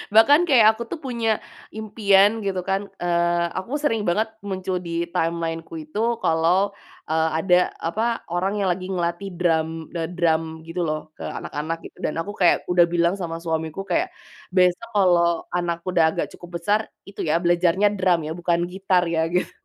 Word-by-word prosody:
Bahkan 285 +9 +7
kayak 220 -5 +6
aku 235 - -5
tuh - - -4
punya 235 -3 -2 0.5
impian 205 -2 +4 0.2
gitu 190 -2 -1
kan, 195 +1 +1 0.2
eee, 175 0 +1
aku 185 +6 -5
sering 225 -7 +1
banget 215 +6 +1 0.2
muncul 190 -1 -2
di 170 - -5 0.2
timeline-ku 165 0 -2
itu 180 +7 -5 0.2
kalau, 175 +5 +2 0.3
eee, 160 0 +2
ada 180 +1 +3 0.3
apa, 210 +7 -1 0.3
orang 185 +3 0
yang 195 - +1
lagi 185 +1 -3
ngelatih 175 +2 -2
drum, 165 -3 +2 0.3
d - - -1 0.2
drum 165 -2 +2 0.2
gitu 165 +2 -5
loh 155 0 -1 0.2
ke - - -8
anak-anak 155 +3 -4
gitu, - - -24
dan - - -1
aku 195 +5 -3
kayak 175 - +6
udah 175 -1 +6
bilang 170 +1 +2
sama 170 -4 -5
suamiku 160 +1 -3
kayak, - - +2 0.5
besok 180 +4 +3
kalau 170 -4 +3
anakku 170 0 -2
udah 165 -2 +5
agak - - -2
cukup 175 - -12
besar, 205 +5 +2 0.3
itu 200 - -13
ya - - +3
belajarnya 175 +3 +3
drum 185 -2 +3
ya, - - -4
bukan 170 -1 +1
gitar 190 -1 +1
ya, - - +1 0.2
gitu. 180 - 0
175 Hz, 170 wpm, -23 LUFS, 170-195 Hz, 0.5 s, Bahkan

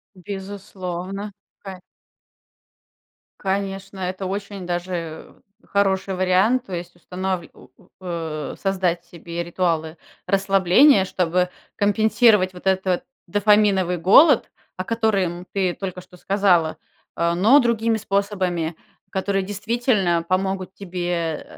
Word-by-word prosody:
Безусловно, 195 0 -6 0.3
ка 190 -2 -9 1.6
конечно, 195 0 -3
это 185 +1 -3
очень 200 0 -5
даже, 175 +1 -3
э, 165 -2 -6 0.3
хороший 195 -1 +1
вариант. 185 +7 +2
То 190 - -9
есть 175 0 -6
устанвль 180 0 -4
у 125 - -17
у - - -22
о 165 -5 -5
создать 185 -3 0
себе 170 0 -6
ритуалы 170 -2 -1 0.3
расслабления, 195 +4 +4
чтобы 180 -1 0 0.3
компенсировать 210 -1 +3
вот 180 - -13
этот 190 -1 +1 0.2
дофаминовый 205 -2 +3
голод, 225 - +5 0.3
о 185 - -2
которым 195 -5 0
ты 190 -3 +1
только 185 -1 -6
что 180 0 -17
сказала, 180 -4 +2 0.4
а, 170 0 +1
но 220 +11 +6
другими 230 -3 +1
способами, 190 -5 -1 0.3
которые 195 0 -1
действительно 205 -3 0
помогут 190 0 -1
тебе, 180 -2 -5
э, 165 -3 -2
190 Hz, 110 wpm, -22 LUFS, 175-200 Hz, 1.6 s, но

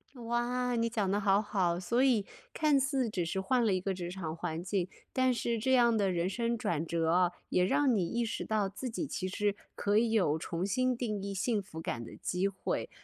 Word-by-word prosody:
哇， 245 +1 -1
你 230 0 +1
讲 210 -4 0
得 205 - +2
好 200 0 +3
好。 185 -5 0
所 235 +7 +1
以 240 -7 +3 0.3
看 300 -3 +3
似 265 -3 0
只 185 -4 -1
是 165 +4 -2
换 245 +5 +2
了 210 - +3
一 185 - +1
个 195 +1 -1
职 175 -2 -5
场 175 -4 -5
环 170 -1 -4
境， 185 -1 -1 0.3
但 260 0 +3
是 235 -1 -1
这 260 +4 +1
样 240 -2 +5
的 200 -3 +2
人 175 0 0
生 235 +3 -1
转 165 -6 -1
折 165 -1 0
哦， 180 0 +3 0.2
也 180 - +3
让 270 +6 +3
你 180 -5 +1
意 235 +5 -1
识 225 - -3
到 215 -2 +1
自 250 +6 -5
己 240 +7 -3
其 185 -9 -3
实 205 +2 0 0.2
可 205 +1 +1
以 225 0 +3
有 180 -9 +2
重 170 +2 -3
新 255 +5 +1
定 215 -5 -2
义 200 0 -4
幸 205 +3 0
福 190 -5 -9
感 115 -7 -3
的 - - -10
机 180 +2 -1
会。 195 -1 -3
205 Hz, 245 characters per minute, -31 LUFS, 180-235 Hz, 0.3 s, 样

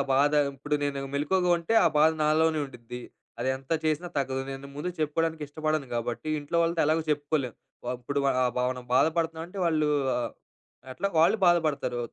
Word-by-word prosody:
ఆ - - +1
బాధ 145 +2 +4 0.2
ఇప్పుడు 150 +3 -2
నేను 140 -1 -2 0.2
మెలుకువగా 180 +5 +1
ఉంటే, 170 +7 -1
ఆ - - +6
బాధ 155 +1 +6
నాలోనే 155 +1 +3
ఉండుద్ది. 125 -2 -9 0.4
అది 125 - 0
ఎంత 135 +3 -6
చేసినా 155 +3 0
తగ్గదు. 135 -1 0
నేను 135 +1 -8
ముందు 150 +5 -3
చెప్పుకోవడానికిష్టపడను 155 -1 -1
గాబట్టి, 120 +5 -3
ఇంట్లో 145 +4 -3
వాళ్ళతో 165 0 +1
ఎలాగూ 160 +1 +2
చెప్పుకోలేం. 145 -3 0 0.3
వ - - -8
అప్పుడు 140 +4 -3
వ - - +3 0.2
ఆహ్, 125 -1 +1 0.2
మనం 125 -1 -9
బాధపడుతనావంటే, 165 +5 0
వాళ్ళూ 155 -2 +2 1.0
ఎట్లా? 200 +9 -1
వాళ్ళూ 165 +7 +5
బాధపడతారు. 155 -7 +2
150 Hz, 160 wpm, -27 LUFS, 135-160 Hz, 1.0 s, ఆ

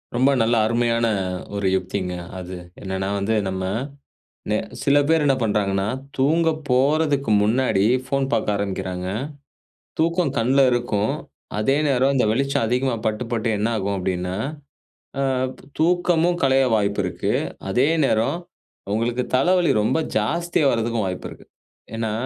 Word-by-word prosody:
ரொம்ப 130 +3 +4
நல்ல 115 +1 +2
அருமையான 115 +1 +1 0.5
ஒரு 100 -1 0
யுக்திங்க 90 0 -3 0.3
அது 90 0 -7 0.2
என்னன்னா, 95 0 -3
வந்து 110 +3 0
நம்ம 95 0 -3 0.9
எ - - +2 0.2
சில 140 +1 +3
பேர் 160 -1 +3
என்ன 135 -2 +4
பண்ணுறாங்கன்னா 100 -3 +1 0.3
தூங்க 160 +5 +3 0.2
போறதுக்கு 140 0 +2
முன்னாடி 110 -2 +2 0.2
ஃபோன் 135 +1 0
பார்க்க 105 - +1
ஆரம்பிக்கிறாங்க. 95 -2 -3 0.9
தூக்கம் 170 -1 +1
கண்ல 130 +4 +2
இருக்கும். 120 -4 0 0.4
அதே 120 +6 +2
நேரம் 135 0 +2
இந்த 125 - +3
வெளிச்சம் 140 +2 +1
அதிகமா 125 +1 +1
பட்டு, 110 +2 0
பட்டு 115 -1 0
என்ன 105 +3 0
ஆகும் 100 0 -1
அப்டின்னா 90 0 -2 0.8
அ - - +1 0.6
தூக்கமும் 175 0 +2
களைய 135 0 +4
வாய்ப்பு 100 -1 0
இருக்கு 90 - -2 0.4
அதே 125 +8 +3 0.2
நேரம் 115 +6 +1 0.6
உங்களுக்கு 120 +3 0
தலவலி 175 +5 +3
ரொம்ப 110 +9 +1 0.2
ஜாஸ்தியா 170 +8 0
வரதுக்கும் 115 -2 0
வாய்ப்பு 90 -1 -4
இருக்கு. - - -13 0.5
ஏனா 115 -1 -2
115 Hz, 130 wpm, -22 LUFS, 100-140 Hz, 0.9 s, ரொம்ப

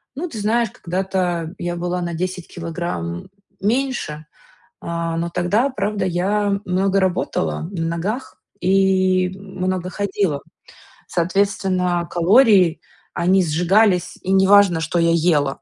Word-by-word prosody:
ну, 345 +5 -3
ты 225 - -7
знаешь, 225 +2 +1
когда-то 180 -2 -2
я 175 0 -3
была 175 +1 -2
на 170 -1 -3
10 180 +1 -4
килограмм 165 - -5 0.3
меньше, 225 - -1 0.6
а, 170 -1 -3
но 170 +1 -2
тогда, 190 +10 +1
правда, 205 -5 -2
я 200 +3 0
много 190 +2 +1
работала 165 - -1
на 165 -4 -3
ногах 215 +10 -4 0.2
и 185 -1 +3
много 185 -2 -3
ходила. 195 -7 -1 0.7
Соответственно, 180 -1 0
калории, 185 -1 +4 0.4
они 185 +2 +3
сжигались, 180 +3 +2
и 190 - -3
неважно, 190 -3 +5
что 165 +1 -1
я 170 0 +3
ела. 155 -5 +1
185 Hz, 120 wpm, -20 LUFS, 170-200 Hz, 0.7 s, неважно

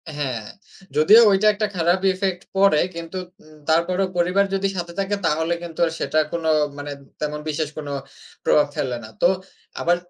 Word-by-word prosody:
হ্যাঁ, 130 -6 -2 0.6
যদিও 205 +10 +8
ওইটা 200 +2 +3
একটা 210 +1 -1
খারাপ 175 +2 +2
ইফেক্ট 185 -1 -2
পড়ে, 195 -5 +5 0.2
কিন্তু 170 +2 -6 0.3
উ - - -21 0.2
তারপরও 175 +4 +2
পরিবার 180 +3 +3
যদি 195 0 +1
সাথে 170 -1 -4
থাকে, 195 +1 0
তাহলে 160 +2 +1
কিন্তু 165 -2 -8
আর 165 - -2
সেটা 155 - +1
কোনো 165 -1 -2 0.3
মানে 145 0 -6 0.3
তেমন 150 0 -3
বিশেষ 155 0 -2
কোনো 145 -2 -5 0.5
প্রভাব 150 -1 +4
ফেলে 125 -2 -1
না। - - -8
তো - - +6 0.5
আবার 175 +1 +3
170 Hz, 165 wpm, -22 LUFS, 150-190 Hz, 0.6 s, যদিও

